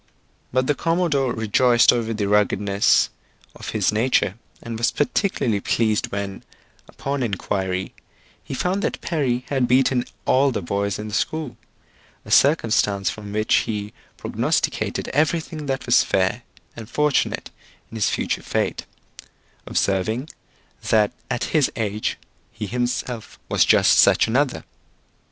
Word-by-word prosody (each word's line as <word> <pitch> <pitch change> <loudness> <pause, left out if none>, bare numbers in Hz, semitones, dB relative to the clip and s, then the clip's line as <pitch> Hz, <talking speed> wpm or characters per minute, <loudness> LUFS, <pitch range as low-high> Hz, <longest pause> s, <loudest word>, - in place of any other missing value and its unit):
But 130 +1 +1
the 145 - +2
commodore 160 -4 0
rejoiced 120 +2 +4
over 115 -2 -1
the 105 -2 -1
ruggedness 100 0 +2 0.4
of - - -8
his 105 -3 +1
nature, 110 -3 +1 0.3
and 115 -1 -5
was 120 +1 +2
particularly 135 - 0
pleased 110 +1 0
when, 100 -1 -4 0.5
upon 140 0 -4
inquiry, 95 -4 -2 0.5
he - - -6
found 185 +7 -1
that - - -2
Perry 130 -7 -1
had 130 -3 +1
beaten 125 0 +3 0.2
all 135 +2 +4
the 115 -7 -3
boys 100 +2 -1
in 105 0 -6
the - - -9
school; 155 +3 -2 0.7
a - - -9
circumstance 110 -9 +3
from 105 -1 -9
which 110 +1 0 0.2
he 105 -1 -4 0.2
prognosticated - - -1
everything 155 0 -1
that 135 0 -2
was 120 0 +5
fair 95 +5 0 0.3
and 110 -1 -9
fortunate 150 +2 0 0.4
in - - -9
his 110 - +1
future - - -2
fate: - - -2 0.8
observing, 110 - -1 0.6
that 105 -2 +3 0.2
at 120 - -2
his 150 -4 +3
age 105 -2 -2 0.3
he - - -6
himself 120 0 -3
was - - +4
just - - +5
such - - +5
another. 130 +3 0
115 Hz, 135 wpm, -22 LUFS, 105-135 Hz, 0.8 s, was